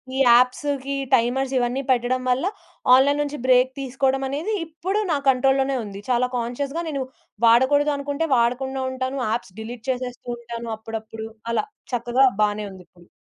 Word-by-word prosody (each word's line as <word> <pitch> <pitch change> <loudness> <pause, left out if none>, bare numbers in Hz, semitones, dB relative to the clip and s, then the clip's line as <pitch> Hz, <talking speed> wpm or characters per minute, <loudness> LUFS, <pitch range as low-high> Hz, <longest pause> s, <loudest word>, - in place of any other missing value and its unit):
ఈ - - -2
యాప్స్‌కి 260 +3 +3 0.2
టైమర్స్ 260 +3 +2
ఇవన్నీ 245 +2 0
పెట్టడం 250 +1 +1
వల్ల 255 +6 +1 0.5
ఆన్‌లైన్ 285 +3 +4
నుంచి 295 0 -3
బ్రేక్ 255 0 +4
తీసుకోవడమనేది, 270 - -1
ఇప్పుడు 350 +6 -3
నా 300 - +2
కంట్రోల్‌లోనే 270 +1 +3
ఉంది. 200 -1 -8
చాలా 250 0 +2
కాన్‌షియస్‌గా 270 +7 -3
నేను 280 -3 -2 0.4
వాడకూడదు 260 +6 +5
అనుకుంటే, 285 +3 -2
వాడకుండా 260 +3 0
ఉంటాను. 260 +1 -3
యాప్స్ 190 -5 -3
డిలీట్ 230 +2 -8
చేసేస్తూ 250 -1 -4
ఉంటాను 235 0 -7
అప్పుడప్పుడు 220 0 -7 0.2
అలా 230 - 0 0.3
చక్కగా 245 +2 +3 0.2
బానే 210 0 +1
ఉందిప్పుడు. 180 -2 -16
255 Hz, 135 wpm, -23 LUFS, 235-275 Hz, 0.5 s, వాడకూడదు